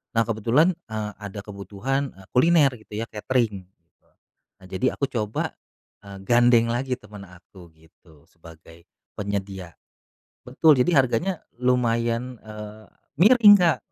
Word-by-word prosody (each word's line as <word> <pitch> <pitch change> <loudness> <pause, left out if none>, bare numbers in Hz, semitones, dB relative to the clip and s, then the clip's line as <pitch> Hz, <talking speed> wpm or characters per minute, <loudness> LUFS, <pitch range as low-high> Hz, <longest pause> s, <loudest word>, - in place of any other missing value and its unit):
Nah 115 - +3
kebetulan, 120 - +2 0.2
eee, 110 -1 -4
ada 100 0 -8
kebutuhan, 105 +7 -4
eee, 95 -1 -17
kuliner 145 +1 +4
gitu 110 - -17
ya 115 +2 -3
catering. 105 -4 -2 0.9
Nah, 95 - -15
jadi 95 +7 -1
aku 140 - -1
coba, 110 -3 -3 0.5
eee, 100 -1 -10
gandeng 120 0 +4
lagi 125 +2 -2
temen 105 -1 -12
aku 90 0 -16
gitu 80 -1 -23
sebagai 80 +1 -17 0.3
penyedia. 95 -3 -5 0.7
Betul 140 +2 +4
jadi 170 +7 +2
harganya 165 +10 -2 0.2
lumayan, 120 -1 0
eee, 105 0 -10 0.3
miring, 210 +1 +7
Kak, 170 -6 +3
115 Hz, 125 wpm, -23 LUFS, 100-130 Hz, 0.9 s, miring